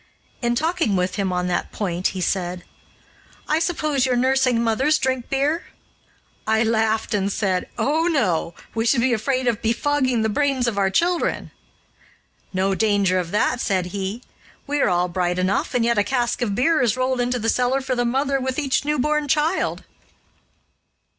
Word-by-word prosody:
In 240 -1 +1
talking 320 - 0
with 180 0 0
him 195 -2 0
on 180 0 -1
that 180 - -2
point, 180 -3 -1
he 185 - -4
said: 180 -1 -2 0.8
"I 310 - +2
suppose 310 -5 0
your 255 -1 +2
nursing 255 -1 +2
mothers 265 +7 +2
drink 260 -2 -2
beer?" 290 +5 0 0.8
I 220 +1 +3
laughed, 220 0 0
and 200 -1 0
said, 190 -3 -1
"Oh, 315 +4 +1
no! 185 - 0 0.2
We 225 - -1
should 240 0 +3
be 255 0 +2
afraid 255 +3 -1
of 235 -3 0
befogging 255 0 +1
the - - +2
brains 270 +2 0
of 210 -4 -1
our 195 -1 +2
children." 345 - 0 1.0
"No 190 +1 0
danger 200 -3 +2
of 175 -2 -3
that," 220 +5 0
said 185 -2 -1
he; 200 +4 -4 0.4
"we 290 0 -1
are - - +3
all 180 0 +1
bright 180 0 -1
enough, 185 +5 0
and 235 -2 +2
yet 235 -2 +2
a - - +3
cask 240 +3 -1
of 210 -5 -1
beer 290 +6 +2
is 240 -1 +1
rolled 255 0 0
into 245 +1 0
the 225 -1 -3
cellar 250 +3 +2
for 260 -1 -3
the 245 -1 0
mother 270 +3 0
with 260 0 -3
each 275 -3 0
newborn 300 +1 0
child." 310 +5 0
240 Hz, 175 wpm, -22 LUFS, 200-270 Hz, 1.0 s, I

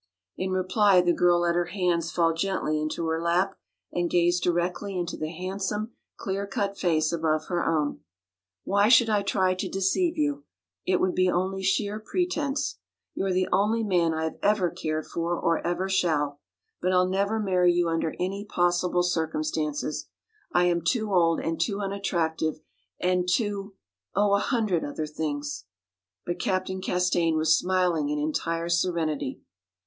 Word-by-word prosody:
In 185 - -3
reply 185 +1 +3
the 175 -1 +2
girl 175 0 +3
let 170 0 +2
her 175 0 +1
hands 175 -2 0
fall 165 0 +2
gently 165 -3 -1
into 155 +2 -2
her 160 0 -1
lap 180 +3 +1 0.4
and 175 -1 -1
gazed 175 +1 +2
directly 180 +3 -1
into 175 -2 -2
the 155 - -4
handsome, 195 +5 -3 0.3
clear 200 -1 -3
cut 200 0 -2
face 160 -5 +1
above 155 -2 0
her 175 -2 0
own. 155 -3 0 0.6
"Why 200 +2 +3
should 235 -2 +6
I 210 -1 +3
try 190 -2 +1
to 185 - -4
deceive 195 - 0
you? 290 -1 0 0.4
It 185 -1 +3
would 185 -1 +1
be 185 0 +2
only 190 +2 -1
sheer 200 +2 0
pretence. 300 +1 -2 0.3
You - - -2
are 195 - 0
the 185 0 +1
only 220 +3 +2
man 175 -5 +2
I 160 0 -2
have 160 - -4
ever 200 -4 +2
cared 155 0 -3
for 170 +1 -2
or 165 -1 +1
ever 175 +2 -1
shall. 150 -7 0 0.4
But 185 - +1
I'll 180 0 +4
never 200 +4 0
marry 180 -4 +3
you 175 0 +1
under 165 -1 -1
any 195 +3 -2
possible 175 -2 +1
circumstances. 155 -3 -2 0.4
I 175 - +3
am 175 -1 +2
too 215 +4 0
old 165 -2 +3
and 165 0 -2
too 200 +3 0
unattractive 170 -6 -1 0.4
and 180 0 +1
too 200 -1 -1 0.4
oh, 200 +1 +3
a 200 - +4
hundred 215 -7 0
other 150 +2 -3
things." 145 - -4 0.6
But 175 0 -3
Captain 185 0 -1
Castaigne 175 -3 +1
was 160 0 +4
smiling 180 -4 +1
in 150 - -1
entire 165 +3 -1
serenity. 170 -5 -1
180 Hz, 165 wpm, -26 LUFS, 165-195 Hz, 0.6 s, should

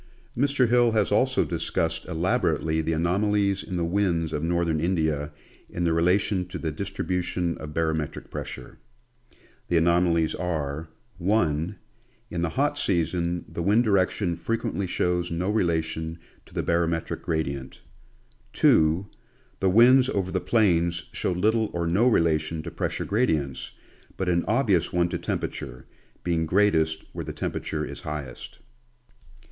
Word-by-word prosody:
Mr. 135 0 +2
Hill 120 -1 +4
has 105 -5 +1
also - - +3
discussed 80 0 -1
elaborately 80 -2 0
the 80 +1 -1
anomalies 100 +4 +1
in 95 - -6
the 85 -1 0
winds 85 -3 0
of 75 - -1
northern 85 -1 0
India 80 -4 0 0.4
in 85 - -3
their 85 -1 +2
relation 90 +3 +2
to 90 0 -6
the 80 -1 -3
distribution 90 0 -2
of 75 -1 -8
barometric 80 -2 -2
pressure. 65 - -7 0.9
The 85 - +2
anomalies 85 -1 +3
are: 80 -3 -3 0.2
— - - -35
(1) 85 -4 +1 0.5
in 85 - -2
the 85 - 0
hot 145 - 0
season 85 -1 0
the - - -5
wind 105 +7 +3
direction 95 -3 +1
frequently 100 0 -2
shows 90 0 0
no 90 +4 -1
relation 80 -4 -1 0.3
to - - -18
the - - 0
barometric 85 -1 0
gradient; 70 -5 -3 0.7
(2) 80 +4 +4 0.5
the 95 - +2
winds 125 +6 +6
over 95 -2 -1
the 95 - 0
plains 85 -4 +2
show - - -1
little 110 +5 +1
or 85 -1 -1
no 95 +9 +3
relation 80 -6 +1
to - - -6
pressure - - -3
gradients, 80 - 0 0.5
but 95 - -2
an 85 -1 +2
obvious 105 -8 +2
one 85 0 +1
to - - -3
temperature, 60 -2 -4 0.4
being 85 -2 0
greatest 80 -4 +2
where - - -4
the - - -5
temperature - - -3
is - - -8
highest. 75 -3 -6
85 Hz, 140 wpm, -26 LUFS, 80-100 Hz, 0.9 s, winds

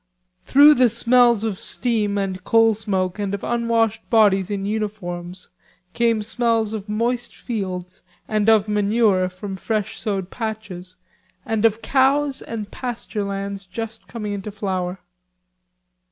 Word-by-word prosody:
Through 290 +8 +7
the 255 -4 +4
smells 235 -1 +4
of 215 -4 -2
steam 215 -4 -1
and 190 -2 -3
coal 225 +1 +4
smoke 195 -3 -2
and 200 -1 -1
of 200 - -9
unwashed 230 -2 0
bodies 200 -4 +4
in 200 -1 -3
uniforms 185 -4 -4 0.4
came 230 -2 +1
smells 225 -1 0
of 210 -1 -6
moist 235 +3 -1
fields 185 -6 -5 0.3
and 215 0 +1
of 220 -2 +4
manure 205 -2 +2
from 190 +2 -7
fresh 215 +2 -3
sowed 195 -4 -2
patches 210 -6 -6 0.5
and 225 0 0
of 220 0 +2
cows 275 +1 +2
and 215 -3 -6
pasture 235 -4 -4
lands 200 0 -5
just 225 +4 -7
coming 210 -3 -5
into 200 +1 -5
flower. 190 -3 -3
215 Hz, 135 wpm, -22 LUFS, 195-230 Hz, 0.5 s, Through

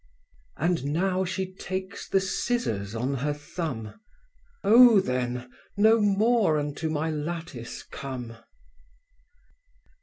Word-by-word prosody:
And 170 -5 0
now 185 +6 +1
she 185 +1 -3
takes 190 +1 -6
the 195 - +3
scissors 190 - -2
on 125 +5 -1
her 145 +3 -1
thumb… 145 - -6 0.6
Oh 230 0 +8
then, 125 -5 -2 0.3
no 220 +2 +5
more 210 -3 +3
unto 145 +2 -2
my 155 +1 -1
lattice 155 -5 -5
come. 125 -4 -7
160 Hz, 100 wpm, -27 LUFS, 130-190 Hz, 0.6 s, Oh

